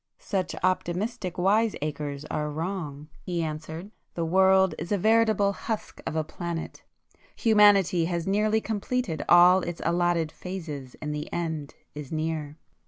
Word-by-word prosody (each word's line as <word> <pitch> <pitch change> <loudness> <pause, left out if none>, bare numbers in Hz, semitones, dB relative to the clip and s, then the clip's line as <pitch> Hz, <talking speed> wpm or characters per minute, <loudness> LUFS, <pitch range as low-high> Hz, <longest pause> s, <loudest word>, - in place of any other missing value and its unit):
"Such 190 -3 -2
optimistic 185 +2 -1
wise 210 +5 +2
acres 145 -1 -4
are 150 0 -1
wrong," 155 -2 -5
he 175 -3 -2
answered,—"The 160 +3 -6
world 190 +1 +4
is 170 +4 -6
a 205 - +3
veritable 215 -1 +3
husk 220 +2 -5
of - - -3
a 160 - +1
planet; 170 +1 -6 0.5
humanity 205 -6 +5
has 170 -1 -2
nearly 215 +3 +2
completed 215 - -2
all 180 +2 +8
its 175 -1 -5
allotted 170 -1 +1
phases, 155 -9 -7
and 150 0 -2
the 150 +1 -5
end 160 -4 -3 0.2
is 150 -2 -8
near." 155 -2 -3
175 Hz, 135 wpm, -27 LUFS, 155-195 Hz, 0.5 s, all